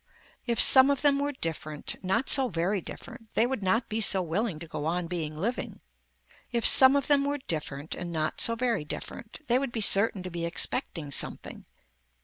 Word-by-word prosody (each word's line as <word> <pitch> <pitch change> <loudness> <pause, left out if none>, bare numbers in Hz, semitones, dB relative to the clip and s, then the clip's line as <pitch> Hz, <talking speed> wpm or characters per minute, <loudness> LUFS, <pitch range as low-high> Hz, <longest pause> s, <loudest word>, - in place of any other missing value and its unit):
If 235 -1 -1
some 265 +1 +7
of 280 -1 -1
them 280 -1 +3
were 285 +1 -2
different, 155 - -5
not 210 +8 -1
so 270 -3 +4
very 185 +3 -2
different, 220 +5 -11
they 225 - +3
would 260 -3 -4
not 225 +5 0
be 220 +1 -3
so 195 -2 +3
willing 180 +2 -3
to 170 - -9
go 155 -2 -7
on 175 +2 -2
being 165 -3 -5
living. 230 +10 -4 0.7
If 235 -1 -1
some 265 +1 +7
of 280 -1 0
them 285 -1 +2
were 285 +1 -2
different 155 - -6
and 175 -1 -7
not 155 -2 -2
so 230 - +5
very 235 -7 -1
different 215 - -9
they 250 -2 +2
would 270 -2 -4
be 235 - -5
certain 200 -1 +3
to 185 - -7
be 170 0 -5
expecting 170 - -2
something. - - -4
205 Hz, 195 wpm, -27 LUFS, 165-255 Hz, 0.7 s, some